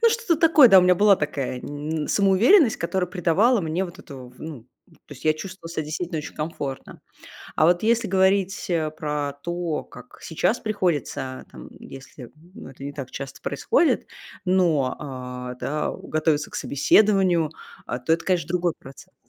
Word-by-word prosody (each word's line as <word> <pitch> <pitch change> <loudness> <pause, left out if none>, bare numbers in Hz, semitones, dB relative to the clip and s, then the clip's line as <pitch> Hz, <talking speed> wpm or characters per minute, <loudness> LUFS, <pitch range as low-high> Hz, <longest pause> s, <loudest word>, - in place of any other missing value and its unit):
Ну, 465 - +6
что-то 460 -7 0
такое, 320 -5 +6
да, 195 - +8
у - - +6
меня 180 0 +5
была 200 +1 +5
такая 140 -4 -3
н 150 +2 -4
самоуверенность, 220 - +4
которая 180 +2 -1
придавала 190 +7 +2
мне 170 +2 -2
вот 175 - -10
эту, 130 -3 -11
в - - -20
ну, 145 -7 -8 0.2
то 145 - -15
есть 130 - -15
я 155 - +4
чувствовала 185 +1 -9
себя 165 -2 -3
действительно 160 +2 -4
очень 150 - -7
комфортно. 145 -4 -6 0.6
А - - +3
вот 175 +2 +3
если 230 +1 +2
говорить, 190 0 +1
э, 160 -3 0
про 150 -2 -3
то, 175 -2 -3
как - - -15
сейчас - - -1
приходится, 165 - -2
там, - - -11
если, 135 0 -11
м, 120 - -15 0.2
но 235 - -10
это 135 +1 -11
не 140 - -5
так 140 -3 -7
часто 135 0 -8
происходит, 395 -9 +1 0.4
но, 170 -8 +2
а, 125 -3 -7
да, 150 +4 -3
э, - - -7
готовиться 155 -1 0
к - - -16
собеседованию, 180 +1 +3 0.4
а, 125 - -3
то 125 +6 -1
это, 170 +1 0
конечно, 175 -5 0
другой 175 -1 0
процесс. 135 0 -14
165 Hz, 175 wpm, -23 LUFS, 145-190 Hz, 0.6 s, да